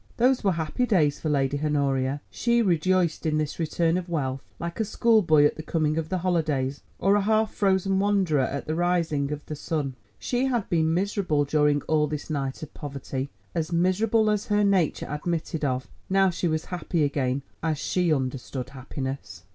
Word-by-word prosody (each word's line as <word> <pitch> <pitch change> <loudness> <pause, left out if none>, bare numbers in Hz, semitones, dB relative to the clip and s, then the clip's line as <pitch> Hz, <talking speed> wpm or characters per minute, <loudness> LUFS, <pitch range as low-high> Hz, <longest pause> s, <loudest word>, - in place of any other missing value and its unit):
Those 250 +1 +3
were 195 -2 +3
happy 165 +10 -1
days 155 -10 +2
for 155 - -2
Lady 140 -1 +1
Honoria! 140 -2 0
She 235 -1 +2
rejoiced 175 -2 +1
in 155 -1 +1
this 155 +1 -2
return 165 +2 +1
of 180 -1 -8
wealth 135 -5 -2 0.2
like 170 +3 -5
a - - +3
school 220 +1 +3
boy 155 -5 +5
at 145 - +1
the - - -4
coming 155 -1 0
of 160 -1 -2
the 185 - 0
holidays, 155 -7 0 0.2
or 195 - +3
a 205 - +3
half 215 +1 +2
frozen 195 -1 +2
wanderer 195 -8 +2
at 135 +1 -2
the 155 - -2
rising 165 -4 0
of 150 0 -5
the 155 - -5
sun. 145 -2 -2 0.2
She 250 +1 -1
had 240 -6 0
been 160 -2 +2
miserable 180 -6 +1
during 150 0 +2
all 155 -1 +2
this 150 +1 -5
night 135 -1 -3
of 155 - -9
poverty, 140 -1 -5 0.2
as 165 0 -2
miserable 210 +6 +2
as 210 -1 -1
her 210 0 +2
nature 195 -6 +2
admitted 160 +1 -3
of, 130 -2 -1 0.2
now 195 0 +4
she 175 +1 -1
was 155 -1 -1
happy 170 -2 0
again, 140 -2 0 0.2
as 160 -1 0
she 180 +3 0
understood 130 -2 -2
happiness. 130 -7 -6
160 Hz, 185 wpm, -26 LUFS, 145-185 Hz, 0.2 s, boy